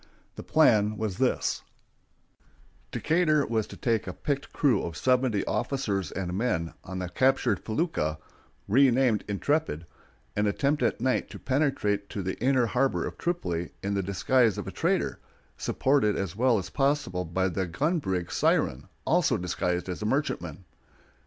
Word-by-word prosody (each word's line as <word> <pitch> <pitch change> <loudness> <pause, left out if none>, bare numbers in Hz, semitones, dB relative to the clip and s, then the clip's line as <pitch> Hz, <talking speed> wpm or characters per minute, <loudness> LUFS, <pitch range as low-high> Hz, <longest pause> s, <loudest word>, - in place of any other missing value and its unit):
The - - -7
plan 110 -9 +3
was 105 -4 -3
this: - - +1 1.3
Decatur 155 -3 +2
was 110 -2 -1
to - - -10
take 115 -5 0
a 95 - -4
picked 140 +5 -3
crew 130 -10 +2
of 85 - -5
seventy 125 -5 +2
officers 100 - -1
and 90 -2 -3
men 95 -7 -1
on 95 0 -6
the 90 -1 -3
captured 130 -1 +1
felucca 110 - -1 0.5
(renamed 125 -1 +4
Intrepid), 105 - -1 0.5
and 105 0 +1
attempt 140 +8 +1
at - - 0
night 130 0 +1
to - - -8
penetrate 130 -8 0
to 100 - -4
the 95 - -2
inner 130 0 +3
harbor 130 +4 +1
of - - -5
Tripoli 90 - -2
in 100 +1 -1
the 100 - +1
disguise 105 +4 +2
of - - -4
a - - -5
trader, - - 0 0.4
supported 130 -6 +1
as 95 -3 -3
well 120 +1 +3
as 95 - -5
possible 135 -11 0
by 90 +3 0
the 95 +1 -2
gun 150 - 0
brig 90 - -2
Siren, 65 +6 +1 0.2
also 160 -8 +3
disguised 90 0 -2
as 90 +1 -5
a 105 - -1
merchantman. 95 - -2
110 Hz, 155 wpm, -27 LUFS, 95-135 Hz, 1.3 s, renamed